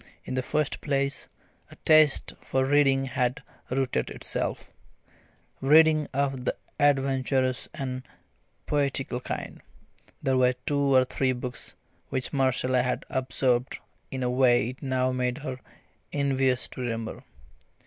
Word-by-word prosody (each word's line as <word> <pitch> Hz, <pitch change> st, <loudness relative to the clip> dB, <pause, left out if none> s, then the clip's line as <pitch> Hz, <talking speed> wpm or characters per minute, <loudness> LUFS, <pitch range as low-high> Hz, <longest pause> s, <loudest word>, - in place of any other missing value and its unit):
In -, -, -5 dB
the 130 Hz, -, 0 dB
first 150 Hz, +3 st, -1 dB
place, 140 Hz, -1 st, -1 dB, 0.4 s
a -, -, -13 dB
taste 155 Hz, -2 st, +5 dB
for 130 Hz, 0 st, 0 dB
reading 135 Hz, -1 st, +3 dB
had 125 Hz, -1 st, -1 dB, 0.3 s
rooted 130 Hz, 0 st, 0 dB
itself -, -, -3 dB, 0.9 s
reading 155 Hz, +2 st, +5 dB
of 135 Hz, -1 st, -1 dB
the -, -, 0 dB, 0.2 s
adventurous 135 Hz, -2 st, +1 dB
and 130 Hz, -4 st, -4 dB, 0.6 s
poetical 140 Hz, -3 st, -1 dB
kind. -, -, -6 dB, 0.6 s
There 130 Hz, -1 st, +2 dB
were 125 Hz, 0 st, +4 dB
two 140 Hz, -2 st, +2 dB
or 130 Hz, 0 st, +6 dB
three 130 Hz, 0 st, 0 dB
books 125 Hz, 0 st, -6 dB, 0.3 s
which 130 Hz, -2 st, -2 dB
Marcella 130 Hz, -2 st, +2 dB
had 125 Hz, 0 st, -2 dB
absorbed 130 Hz, -1 st, 0 dB, 0.3 s
in 130 Hz, -1 st, -4 dB
a 125 Hz, -, +1 dB
way 125 Hz, -3 st, +3 dB
it 130 Hz, -, -15 dB
now 130 Hz, -1 st, 0 dB
made 125 Hz, 0 st, -1 dB
her 130 Hz, -4 st, -5 dB, 0.5 s
envious 135 Hz, -3 st, +1 dB
to -, -, -8 dB
remember. 115 Hz, -2 st, -4 dB
130 Hz, 130 wpm, -27 LUFS, 125-140 Hz, 0.9 s, or